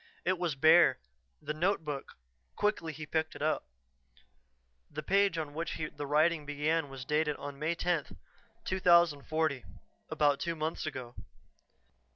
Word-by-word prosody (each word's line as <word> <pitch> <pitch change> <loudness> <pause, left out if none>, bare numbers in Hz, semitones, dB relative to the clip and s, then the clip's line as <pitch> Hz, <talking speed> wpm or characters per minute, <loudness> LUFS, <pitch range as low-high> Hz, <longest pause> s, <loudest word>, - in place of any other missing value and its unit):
It 185 -1 +1
was 170 -5 -1
bare. 160 +5 +6 0.5
The 150 +1 -3
notebook 155 -4 -2 0.4
quickly 205 -6 0
he 155 0 -8
picked 160 +1 -2
it - - -5
up. 155 - 0 1.2
The 155 +1 -6
page 195 0 +2
on 155 -3 -4
which 165 +2 -4 0.2
the 145 - -5
writing 155 +2 +3
began 145 +1 -1
was 135 -2 -8
dated 150 0 +1
May 145 +4 -3
10, 170 -3 -1 0.5
2040. 160 -5 +2 0.5
About 145 -2 +2
two 170 -1 -2
months 155 0 -3
ago. 130 -5 -6
155 Hz, 130 wpm, -31 LUFS, 145-170 Hz, 1.2 s, bare